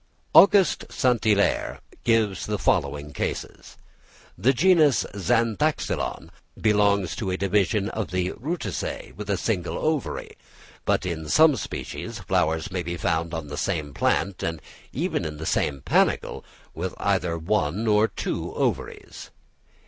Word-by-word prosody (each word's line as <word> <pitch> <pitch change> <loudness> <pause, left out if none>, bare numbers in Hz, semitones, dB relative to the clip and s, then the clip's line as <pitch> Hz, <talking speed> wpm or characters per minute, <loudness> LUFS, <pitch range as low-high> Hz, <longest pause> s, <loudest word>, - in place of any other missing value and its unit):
Aug. 195 -4 +5
St. 125 -4 +1
Hilaire 105 -2 +2 0.2
gives 110 -5 +1
the 105 0 -1
following 75 -5 0
cases: - - -5 0.6
the 115 +9 +3
genus 155 -1 +4
Zanthoxylon 115 - 0 0.3
belongs 100 -4 +2
to 100 - -3
a 95 - -1
division 100 +1 +1
of 110 -4 -4
the 90 0 -1
Rutaceæ 160 +8 -4
with 105 +1 -7
a 100 - +1
single 90 -4 -2
ovary, 155 -3 -2 0.5
but - - +1
in 80 -3 -4
some 155 -2 +6
species - - -5
flowers 80 +5 0
may 90 -1 -2
be 85 +1 -4
found 80 0 -1
on 80 -2 -4
the 75 0 -7
same 75 -7 -2
plant, 95 +6 0
and 80 -1 -2 0.3
even - - -1
in 75 -2 -5
the 80 - -6
same 70 -3 0
panicle, - - +1 0.3
with 90 +3 -4
either 90 -4 0
one 95 +3 0
or 105 0 +4
two - - -4
ovaries. - - -3
100 Hz, 135 wpm, -25 LUFS, 85-110 Hz, 0.6 s, some